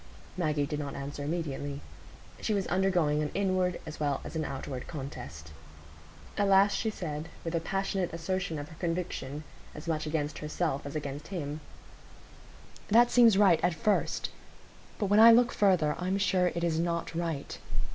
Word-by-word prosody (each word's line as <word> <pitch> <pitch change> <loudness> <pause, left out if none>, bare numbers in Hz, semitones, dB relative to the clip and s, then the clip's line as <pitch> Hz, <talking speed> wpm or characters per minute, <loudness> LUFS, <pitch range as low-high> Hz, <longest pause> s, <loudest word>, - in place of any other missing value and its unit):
Maggie 155 -5 0
did 150 +1 -3
not 145 -2 -4
answer 140 +1 -5
immediately. 145 -3 -3 0.6
She 215 - 0
was 195 -2 0
undergoing 175 -5 +2
an 150 - -1
inward 185 -2 +1
as 155 - -8
well 145 -2 0
as - - -8
an 160 - 0
outward 135 -2 -5
contest. 80 - -7 0.9
At 205 - +3
last 195 +1 +5
she 220 - 0
said, 160 -6 -5
with 165 - -3
a 165 - +2
passionate 195 +1 -1
assertion 170 0 -2
of 145 +1 -6
her 160 - -12
conviction, 165 -4 -3 0.3
as 150 +2 -9
much 155 -2 -1
against 150 -1 -2
herself 150 -2 -2
as 140 - -7
against 145 -1 -4
him,— 155 -5 -4 1.3
"That 235 +3 +5
seems 230 -5 +6
right—at 175 -4 +4
first; 205 +6 0 0.7
but 210 - 0
when 205 +2 +4
I 230 +1 +10
look 240 +1 +5
further, 180 -7 +3
I'm 185 +2 0
sure 190 -2 +2
it 170 -1 -2
is 165 -2 +1
not 170 0 -1
right. 165 -4 -3
165 Hz, 165 wpm, -30 LUFS, 150-190 Hz, 1.3 s, I